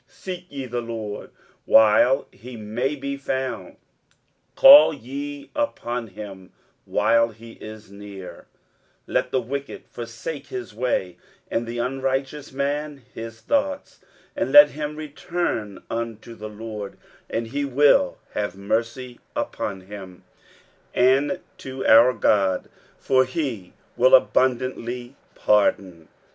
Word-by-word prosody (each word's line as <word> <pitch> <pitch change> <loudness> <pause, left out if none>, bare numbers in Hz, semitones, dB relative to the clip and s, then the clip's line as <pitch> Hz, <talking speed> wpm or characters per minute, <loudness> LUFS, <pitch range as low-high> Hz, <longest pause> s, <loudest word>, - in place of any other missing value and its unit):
23:055:006 - - -27
Seek 180 -1 -6
ye 140 -2 -6
the 120 -1 -3
LORD 110 -3 -6 0.4
while 110 +4 +5
he 125 0 -11
may 115 +7 -2
be 140 0 -4
found, 130 -1 -4 0.8
call 275 - +9
ye 140 +3 -7
upon 125 - -2
him 95 -2 -10 0.3
while 115 0 +3
he 115 +1 -13
is 110 -2 -11
near: 100 -2 -10 0.6
23:055:007 - - -10
Let - - +1
the 130 - 0
wicked 140 +4 -6
forsake 120 +5 -7
his 125 -4 -6
way, 105 -6 -1 0.3
and 115 0 -1
the 120 +1 -5
unrighteous 135 +3 -2
man 140 +1 -3
his 115 0 -8
thoughts: 285 0 -1 0.4
and - - -1
let 290 0 +10
him 150 0 -5
return 150 - -4
unto 115 0 -5
the 110 -1 -8
LORD, 105 -1 -7 0.3
and 115 +1 -2
he 145 +3 -2
will 145 - +3 0.2
have 105 -3 -3
mercy 115 +5 -3 0.2
upon 95 -2 -3
him; 95 -2 -11 0.7
and 135 +7 +3 0.2
to 130 0 -6
our 115 +3 +7
God, 100 -4 +1 0.3
for 130 -1 +3
he 130 - -4 0.2
will 130 +2 +6
abundantly 125 -1 0 0.2
pardon. 95 -5 +1
120 Hz, 125 wpm, -23 LUFS, 110-140 Hz, 0.8 s, let